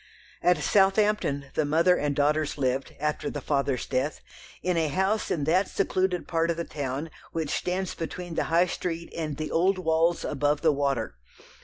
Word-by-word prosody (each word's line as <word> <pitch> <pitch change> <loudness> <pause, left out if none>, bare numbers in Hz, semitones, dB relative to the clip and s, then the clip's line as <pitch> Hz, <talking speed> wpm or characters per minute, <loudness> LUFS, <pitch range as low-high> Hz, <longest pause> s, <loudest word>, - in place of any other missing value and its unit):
At 180 -1 +4
Southampton 195 -5 +2
the 155 - +1
mother 165 +5 +4
and 145 -3 -1
daughters 150 +1 +1
lived, 135 -1 -1
after 150 +1 -1
the 145 - -4
father's 140 -3 0
death, 135 +4 -1 0.4
in 180 0 +1
a 165 -2 +2
house 190 +7 0
in 150 - 0
that 180 +6 +3
secluded 185 -2 0
part 165 0 +1
of 170 - 0
the 170 - -1
town 145 +1 -4 0.2
which 160 -3 -2
stands 185 +1 -1
between 175 +1 -6
the - - 0
High 170 +2 +4
Street 170 -1 -4
and 155 -4 -3
the 155 - -4
old 185 +3 +3
walls 165 -1 +1
above 145 +1 0
the 160 -1 +4
"Water." 135 - -1
160 Hz, 175 wpm, -27 LUFS, 145-180 Hz, 0.4 s, At